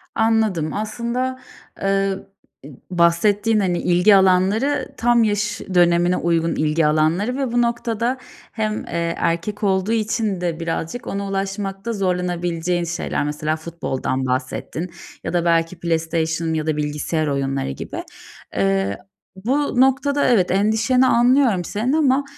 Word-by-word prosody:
Anladım. 220 -8 +1
Aslında, 235 +4 -3 0.4
eee, 195 0 +1 0.5
i 145 +1 -11
b - - -16
bahsettiğin, 205 +5 +3
hani, 180 -3 0
ilgi 180 +4 +4
alanları, 195 +9 +2
tam 240 0 +3
yaş 210 0 -1
dönemine 175 0 +4
uygun 165 -1 0
ilgi 155 +1 +1
alanları 160 - +1
ve 270 -4 -1
bu 240 0 +2
noktada 235 +1 -1 0.3
hem, 215 -1 -2
eee, 170 0 -2
erkek 170 +6 -2
olduğu 190 +1 +1
için 220 -3 0
de 170 -2 -2
birazcık 165 +7 -4
ona 200 0 -3
ulaşmakta 195 +2 -3
zorlanabileceğin 175 -2 -1
şeyler. 170 -2 -2
Mesela 150 +1 -1
futboldan 155 -5 -3
bahsettin 140 +6 -3 0.3
ya - - -4
da 175 -1 +1
belki 165 +1 +1
PlayStation 165 -1 -1
ya 155 0 -2
da 155 -1 0
bilgisayar 150 +1 -1
oyunları 135 - -1
gibi. - - -6 0.5
Eee, 95 0 +1 0.4
bu 255 +6 0
noktada 280 +2 +2
evet, 205 -8 +3
endişeni 220 +6 +3
anlıyorum 240 -5 +3
senin 225 - -1
ama 280 -3 +3
190 Hz, 130 wpm, -21 LUFS, 165-225 Hz, 0.5 s, ilgi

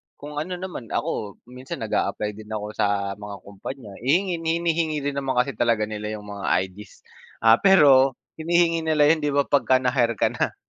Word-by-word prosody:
kung 150 +1 -7
ano 180 +4 -4
naman 175 -10 -7
ako, 100 -2 -3 0.2
minsan 130 +1 -7
nag - - -6
a-apply 105 0 -1
din 105 +1 -12
ako 105 0 -4
sa 100 -2 0
mga 105 -1 -7
kumpanya, 105 +3 -9
hihingin 170 - +1
hinihingi 165 -2 0
din 140 0 -2
naman 135 -1 -2
kasi 125 +3 +2
talaga 115 -3 +1
nila 105 0 -4
yung 105 - -9
mga 100 -1 -6 0.2
ID's, 100 +2 -14 0.4
ah, 115 +1 +6
pero, 140 -9 +6 0.2
hinihingi 165 +1 +2
nila 150 -1 +4
yun 160 - +2
di 145 -1 -1
ba 140 - +4
pagka 130 -2 +2
na-hire 120 -3 +1
ka - - +1
na? - - -2
130 Hz, 185 wpm, -24 LUFS, 105-155 Hz, 0.4 s, ah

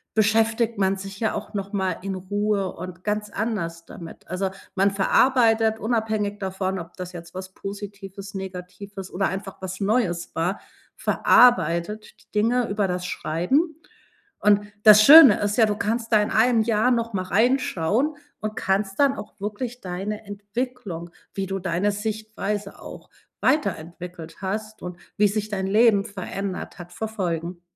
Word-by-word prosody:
beschäftigt 225 +1 +2
man 195 0 +2
sich 195 0 -8
ja 220 - 0
auch - - -6
noch 200 0 -4
mal 190 -2 -1
in 195 0 -4
Ruhe 200 +1 -1
und 180 0 -9
ganz 210 0 -2
anders 190 -7 -3
damit. 165 -2 -11
Also, 185 +2 -2 0.2
man 195 +1 +3
verarbeitet 225 +2 +3
unabhängig 220 -3 -1
davon, 190 0 -2
ob 170 +1 -10
das 180 -1 -6
jetzt 170 0 -10
was 185 0 -7
Positives, 200 0 -8
Negatives 190 +1 -8
oder 195 +2 0
einfach 195 0 -6
was 185 0 -5
Neues 200 -4 0
war, 175 +5 -1 0.4
verarbeitet 210 -3 +3
die - - -42
Dinge 230 +3 +2
über 200 -1 0
das 180 0 -3
Schreiben. 265 - 0 0.6
Und 205 0 +4 0.2
das 215 -1 +9
Schöne 280 -3 +10
ist 205 0 -1
ja, 225 - +6
du 210 - 0
kannst 225 +3 -2
da 215 -2 +5
in 210 - -2
1 230 +1 +4
Jahr 220 +1 +2
noch 230 -2 0
mal 185 -2 -1
reinschauen 235 - +1 0.2
und 215 0 -4
kannst 195 +1 -1
dann 280 -1 +4
auch 210 0 -10
wirklich 225 +5 -5
deine 195 +4 -5
Entwicklung, 205 -3 -5 0.2
wie 195 - -2
du 195 0 -3
deine 185 +2 0
Sichtweise 210 -1 -4
auch - - -11 0.3
weiterentwickelt 175 - -2
hast 215 +3 -4
und 180 -1 -7 0.2
wie 210 - +5
sich 210 +1 -2
dein 190 -2 -2
Leben 210 0 +4
verändert 195 -1 -5
hat, 175 0 -10
verfolgen. 180 -6 -3
200 Hz, 155 wpm, -24 LUFS, 185-220 Hz, 0.6 s, Schöne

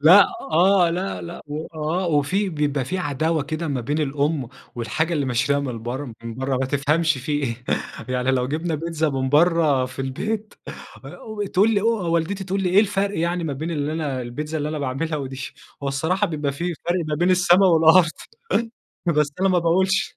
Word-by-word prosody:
لأ، 180 +7 +8 0.2
آه، 175 +2 +4
لأ، 185 +3 -3
لأ 170 0 -8
وآه، 155 +4 -3
وفي 170 +6 +1
بيبقى 145 -4 -1
في 185 +7 -3
عداوة 155 0 0
كده 155 +2 -4
ما 135 -4 -1
بين 145 +7 -2
الأم، 145 -2 0 0.3
والحاجة 120 +9 -1
اللي 145 -4 0
مشتريها 140 +3 +1
من 125 -5 -5
برّه 125 +1 -4
من 115 -1 -6
برّه 130 +1 -1
ما 130 0 0
تفهمش 150 +2 +1
في 135 +4 -4
إيه 125 -5 -2 0.4
يعني. 125 +1 0
لو 125 -1 +1
جِبنا 160 +2 -2
بيتزا 160 0 -1
من 130 -1 -1
برّه 155 -3 +4
في 130 +1 -12
البيت، 215 +11 -3 0.5
آآ 215 -2 -6
تقول 205 +5 +5
لي 200 - +2
أ - - -4
والدتي 190 -3 0
تقول 195 +1 -1
لي 180 - +1
إيه 195 +3 +6
الفرق 200 -2 0
يعني 170 +1 0
ما 150 - -2
بين 155 +5 -4
اللي 150 -1 -2
أنا 145 -6 -2
البيتزا 150 +6 -4
اللي 150 - -2
أنا 155 0 -3
باعملها 145 +4 -2
ودي؟ 135 -2 -5 0.4
هو 140 - -1
الصراحة 165 +9 0
بيبقى 150 -3 -2
في 170 +4 -3
فرق 175 +3 -2
ما 150 - 0
بين 175 +4 +2
السما 180 +1 +5
والأرض، 165 0 +6 1.0
بس 150 -3 +2
أنا 195 - +3
ما 180 -1 +3
باقولش. 190 +3 +1
155 Hz, 190 wpm, -23 LUFS, 140-175 Hz, 1.0 s, لأ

